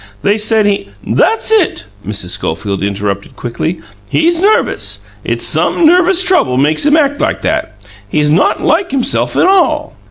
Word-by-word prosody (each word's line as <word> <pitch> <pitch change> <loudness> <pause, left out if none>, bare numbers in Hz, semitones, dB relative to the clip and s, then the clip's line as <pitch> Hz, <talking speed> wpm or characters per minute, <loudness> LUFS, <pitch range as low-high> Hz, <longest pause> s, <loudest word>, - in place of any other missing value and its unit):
They 205 +2 +1
said 215 0 +2
he 205 -1 -1
" - - -29
"That's 450 0 +1
it!" 395 - +2 0.2
Mrs. 100 -2 -4
Schofield 95 +3 -3
interrupted 100 0 -3
quickly. 155 +8 -4 0.3
"He's 335 +1 +1
nervous. 420 +3 0 0.2
It's - - -2
some 340 - +1
nervous 360 +2 +4
trouble 130 - +2
makes 150 +3 +2
him 300 +1 +4
act 285 -2 +1
like - - -1
that. 105 - -2 0.3
He's 150 +5 +1
not 165 - +1
like 345 +4 +1
himself 265 -2 -1
at - - +3
all." 380 0 +1
210 Hz, 160 wpm, -13 LUFS, -, 0.3 s, nervous